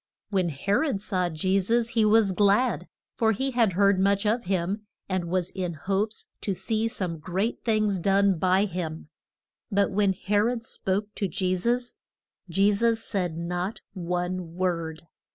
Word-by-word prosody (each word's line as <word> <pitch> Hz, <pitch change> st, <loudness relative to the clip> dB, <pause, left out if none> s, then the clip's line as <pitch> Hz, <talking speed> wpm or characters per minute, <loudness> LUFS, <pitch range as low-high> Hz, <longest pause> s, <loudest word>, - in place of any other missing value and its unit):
When 185 Hz, -4 st, +1 dB
He 155 Hz, +6 st, -4 dB
rod 245 Hz, -1 st, +2 dB
saw 185 Hz, -3 st, -1 dB
Je 185 Hz, +5 st, +1 dB
sus 230 Hz, +4 st, +1 dB
he 225 Hz, -2 st, +2 dB
was 215 Hz, -2 st, +4 dB
glad, 205 Hz, +6 st, +2 dB, 0.3 s
for 225 Hz, -2 st, +4 dB
he 265 Hz, +6 st, -1 dB
had 230 Hz, -6 st, +2 dB
heard 200 Hz, +1 st, +4 dB
much 200 Hz, +1 st, +2 dB
of 230 Hz, +3 st, +1 dB
him, 195 Hz, +3 st, -1 dB, 0.2 s
and 185 Hz, -2 st, -1 dB
was 180 Hz, 0 st, -1 dB
in 180 Hz, -3 st, -3 dB
hopes 200 Hz, +7 st, -2 dB, 0.2 s
to 195 Hz, -, -1 dB
see 220 Hz, +4 st, 0 dB
some 180 Hz, -7 st, -3 dB
great 190 Hz, +8 st, -2 dB
things 215 Hz, -4 st, +1 dB
done 195 Hz, 0 st, +3 dB
by 185 Hz, +3 st, +3 dB
him. 170 Hz, -4 st, -5 dB, 0.6 s
But 200 Hz, 0 st, +2 dB
when 200 Hz, 0 st, +2 dB
He 195 Hz, +2 st, -3 dB
rod 230 Hz, +2 st, +1 dB
spoke 205 Hz, +1 st, -2 dB
to 200 Hz, -, -1 dB
Je 185 Hz, -1 st, 0 dB
sus, 240 Hz, +6 st, 0 dB, 0.6 s
Je 195 Hz, +4 st, +3 dB
sus 230 Hz, +2 st, +2 dB
said 180 Hz, -5 st, -2 dB
not 180 Hz, +4 st, -3 dB
one 180 Hz, -1 st, -3 dB
word. 170 Hz, -3 st, -2 dB
195 Hz, 165 wpm, -26 LUFS, 180-215 Hz, 0.6 s, was